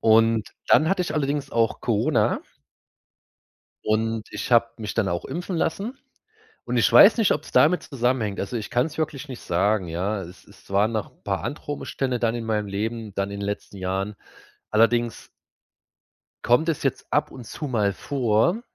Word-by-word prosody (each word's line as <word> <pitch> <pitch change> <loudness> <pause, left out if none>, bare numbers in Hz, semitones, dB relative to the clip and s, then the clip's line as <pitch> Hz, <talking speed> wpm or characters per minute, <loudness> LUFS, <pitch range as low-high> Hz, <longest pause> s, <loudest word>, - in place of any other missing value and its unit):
Und 115 0 +4 0.2
dann 160 - +5
hatte 190 -2 +2
ich 175 - -4
allerdings 145 -1 -1
auch 115 -1 +1
Corona - - +1 1.4
und 110 0 -1
ich - - -5
habe 115 0 +5
mich 105 -2 -5
dann 115 -4 +1
auch 85 0 -2
impfen 175 +1 -4
lassen. 200 +11 -2 0.7
Und - - -2
ich - - +3
weiß - - +9
nicht, 220 -5 +3
ob's 150 - -4
damit 175 +4 +4
zusammenhängt. 120 -6 -1
Also, 110 +5 -3
ich 110 - -5
kann's 150 +6 0
wirklich 150 -2 -3
nicht 130 - -7
sagen, 100 +2 +1
ja? 95 +5 -2
Es 90 +2 -12
waren - - -17
zwar 100 +2 0
noch 110 -3 -3
'n - - -33
paar 95 -1 -1
andere 145 0 -4
Umstände 130 -3 -2
dann 115 -1 +1
in 115 -1 -4
meinem 105 -2 -1
Leben, 110 +1 -4
dann 100 0 -1
in 100 0 -6
den 100 - -3
letzten 100 0 -5
Jahren, 95 +2 -2 0.6
allerdings 115 +2 +2 1.2
kommt 125 +7 +4
es 160 -4 -1
jetzt 135 - -1
ab 150 +1 +1
und 125 -3 -10
zu 150 - -5
mal 105 -5 +1
vor, 130 - +1
115 Hz, 175 wpm, -24 LUFS, 105-140 Hz, 1.4 s, weiß